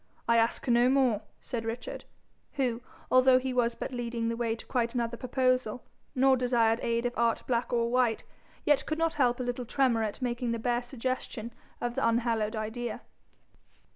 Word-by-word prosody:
I 235 - +4
ask 230 +3 +1
no 240 +1 +4
more,' 255 -6 +3 0.2
said 235 -2 -4
Richard, 225 +2 -5 0.5
who, 250 -5 -1 0.3
although 255 0 +6
he 255 0 -2
was 240 -1 +1
but - - -5
leading 235 -1 -2
the 230 - -1
way 230 -1 -1
to - - -11
quite 235 0 -1
another 235 -1 -1
proposal, 255 -1 0 0.3
nor 265 +1 +5
desired 235 -3 +2
aid 235 0 0
of 245 - 0
art 230 -1 +1
black 240 -1 -1
or 235 -1 +2
white, 245 -3 +2 0.4
yet 295 -2 +3
could 310 - -1
not 330 0 +1
help 245 -4 +2
a - - -1
little 245 0 -3
tremor 245 -1 +1
at 215 -2 -3
making 240 -2 -1
the - - -1
bare 240 +1 0
suggestion 245 -2 -4 0.3
of 240 0 -2
the - - +1
unhallowed 230 -2 +1
idea. 220 +3 -4
240 Hz, 180 wpm, -29 LUFS, 230-255 Hz, 0.5 s, although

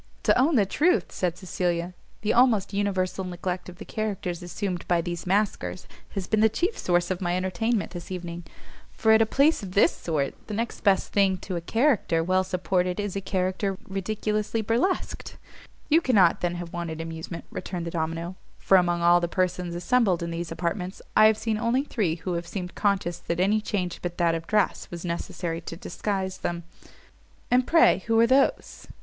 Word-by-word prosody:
"To - - +4
own 280 +5 +3
the 210 -5 +4
truth," 335 - +1
said 180 -2 -2
Cecilia, 180 -1 -2 0.3
"the 215 - +1
almost 235 -6 +3
universal 195 -2 -1
neglect 180 0 -4
of 180 - -10
the 215 - -9
characters 195 -5 -3
assumed 175 +1 -4
by 175 -1 +3
these 175 +1 -4
masquers 195 -2 0 0.3
has 195 -2 -2
been 215 - +1
the 220 +1 +5
chief 355 - -1
source 175 0 +1
of 185 0 -2
my 175 0 0
entertainment 190 +4 -1
this 175 -1 -8
evening: 175 -2 -5 0.5
for 220 - +2
at 220 0 +6
a 225 - +3
place 285 +7 +3
of 190 -3 -7
this 200 - +4
sort, 150 -5 -2
the 210 - -4
next 230 +2 -3
best 200 -2 +2
thing 195 -2 +3
to 185 - -4
a 170 - -2
character 225 - +2
well 185 +2 +2
supported 180 0 -1
is 205 -2 -3
a 195 - -2
character 190 +1 -1
ridiculously 210 +3 -2
burlesqued." 235 - -1 0.5
"You 320 +2 +4
cannot, 200 - +4
then, 175 0 0
have 175 -1 -7
wanted 170 -2 -4
amusement," 165 +1 -6
returned 180 -2 -5
the 170 - -4
domino, 165 +2 -3 0.2
"for 195 - +4
among 175 -1 +1
all 175 +1 +6
the 170 - 0
persons 180 -1 -1
assembled 190 -2 +2
in 170 - -3
these 165 0 -4
apartments, 180 +3 -3
I 215 0 +8
have 220 -1 +3
seen 220 -1 -1
only 240 +4 +1
three 205 - -1
who 170 +2 -4
have 170 0 -3
seemed 180 -1 -5
conscious 195 -4 0
that 170 0 -3
any 205 +4 +3
change 180 -5 -2
but 175 -1 -4
that 170 -2 +2
of 165 0 -4
dress 210 -2 +1
was 175 0 -7
necessary 170 0 -3
to 165 - -7
disguise 190 0 -3
them." 170 0 -3 0.9
"And 250 0 +3
pray 330 -9 +5
who 225 0 +3
are 230 - +7
those?" 265 +3 +1
185 Hz, 190 wpm, -26 LUFS, 175-215 Hz, 0.9 s, I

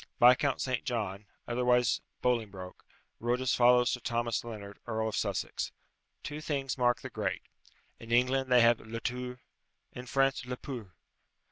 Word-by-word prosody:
Viscount 125 +3 +5
St. 130 -2 -1
John, 105 -6 -3 0.2
otherwise 125 0 +2 0.2
Bolingbroke, 105 -7 -2 0.4
wrote 120 +2 0
as 130 -1 +1
follows 125 0 +5
to 125 - -2
Thomas 115 -1 -1
Lennard, 105 -4 -8
Earl 110 -1 -1
of - - -4
Sussex: - - -2 0.5
"Two 150 +1 -5
things 140 -4 -2
mark 120 -2 +2
the - - -6
great - - -2 0.6
in 115 0 -10
England, 130 +2 +2
they 125 -1 +7
have 115 0 +5
le 115 +1 -6
tour; 125 +1 -4 0.5
in 125 0 -8
France, 135 +2 +2
le 125 0 -5
pour." 120 - -7
125 Hz, 150 wpm, -31 LUFS, 115-125 Hz, 0.6 s, they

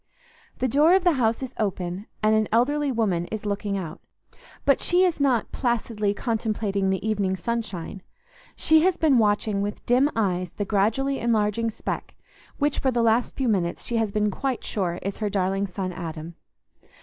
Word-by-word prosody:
The 255 - 0
door 300 +8 +5
of 380 - +2
the 355 - +5
house 240 -4 +1
is 260 0 -6
open, 190 -1 -2 0.2
and 215 0 +4
an 215 -1 +2
elderly 285 +5 +2
woman 200 -8 0
is 215 -1 -6
looking 200 0 -2
out; 170 -5 -6 0.6
but 275 - +4
she 355 +1 +3
is 355 -4 +1
not 255 -6 +2
placidly 225 -4 -1
contemplating 210 -4 -1
the 190 +3 -1
evening 200 -3 0
sunshine; 195 -3 -4 0.5
she 315 0 +4
has 370 +1 +2
been 290 -6 +4
watching 205 -1 +1
with 205 +1 -4
dim 255 +4 +4
eyes 185 -5 -1
the 205 - -3
gradually 225 +8 +1
enlarging 225 -1 +1
speck 220 - -5 0.4
which 290 0 0
for 265 - +1
the 240 -2 +1
last 230 +2 +2
few 265 - -1
minutes 180 -6 0
she 235 - -1
has 220 -2 0
been 210 0 +1
quite 265 +4 -2
sure 180 -4 -2
is 195 0 -4
her 210 -2 -1
darling 195 0 0
son 185 0 -4
Adam. 165 -2 -6
215 Hz, 175 wpm, -25 LUFS, 195-250 Hz, 0.6 s, door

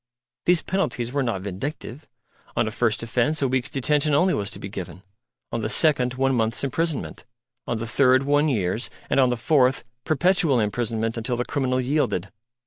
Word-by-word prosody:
These 180 -1 +3
penalties 150 -10 -2
were 140 - +1
not 115 -7 -2
vindictive: 120 - -6 0.5
on - - +2
a - - -2
first - - 0
offence 125 +6 0
a - - +3
week's 130 +1 -1
detention 145 +2 +1
only 180 +5 +3
was 100 -1 -1
to - - -6
be - - -7
given; 95 -1 -8 0.5
on 115 - -2
the 110 - -2
second, 125 -6 +2
one 135 +1 +1
month's 115 0 0
imprisonment; 145 +2 -2 0.4
on 115 - -1
the 115 - -4
third, 130 +2 +3
one 145 +2 +2
year's; 105 -2 0 0.2
and - - +3
on 130 -2 +5
the 125 - -1
fourth, 130 +1 +2 0.2
perpetual 160 -3 +2
imprisonment 115 +1 -1
until 120 +2 -2
the 125 - -1
criminal 130 -2 0
yielded. 125 - 0
130 Hz, 180 wpm, -24 LUFS, 115-145 Hz, 0.5 s, on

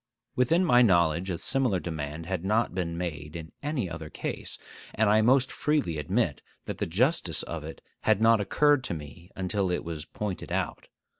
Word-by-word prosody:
Within 165 +9 +3
my 125 -6 +6
knowledge 85 -4 +3
a 90 - -1
similar 125 -3 +1
demand 80 -1 -5
had 90 -1 -3
not 110 +4 +1
been 85 -3 -2
made 80 -3 -5
in 80 -2 -7
any 145 -8 -1
other 80 -2 -7
case; - - -5 0.4
and 105 -1 +3
I 110 +1 +5
most 130 +3 +4
freely 140 - 0
admit 75 - 0 0.2
that - - -5
the - - -1
justice 90 - +1
of 85 -3 -5
it 80 +1 -8 0.2
had 110 -2 +2
not 115 -1 +5
occurred 145 +6 +3
to 85 - -3
me 80 +4 -10
until 95 0 -1
it 90 - -1
was 80 -2 -5
pointed 105 +1 -5
out. - - -2
95 Hz, 180 wpm, -28 LUFS, 80-120 Hz, 0.4 s, my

